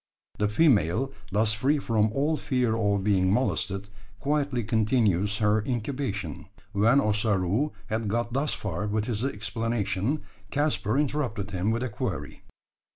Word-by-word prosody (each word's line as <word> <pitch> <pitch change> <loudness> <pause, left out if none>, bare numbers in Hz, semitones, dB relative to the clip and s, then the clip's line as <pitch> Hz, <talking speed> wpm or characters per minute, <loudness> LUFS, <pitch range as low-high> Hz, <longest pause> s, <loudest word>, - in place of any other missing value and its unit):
The 105 - +3
female, 120 - +3 0.2
thus 105 +2 +2
free 135 +8 +2
from 110 -5 +1
all 145 +6 +1
fear 125 -6 0
of 100 -3 +1
being 95 -2 +3
molested, 100 -4 0 0.3
quietly 140 -3 0
continues 105 -2 +2
her 105 0 +3
incubation! 115 - -3 0.2
When 110 +6 +4
Ossaroo 105 - +1
had 110 +1 -2
got 115 +3 -1
thus 140 +3 0
far 100 0 -3
with 105 +1 0
his 115 -1 -2
explanation, 115 +1 -1 0.3
Caspar 140 -5 +1
interrupted 130 -8 -1
him 95 +2 0
with 115 +2 0
a 130 - -2
query. 95 - -4
110 Hz, 135 wpm, -27 LUFS, 105-130 Hz, 0.3 s, When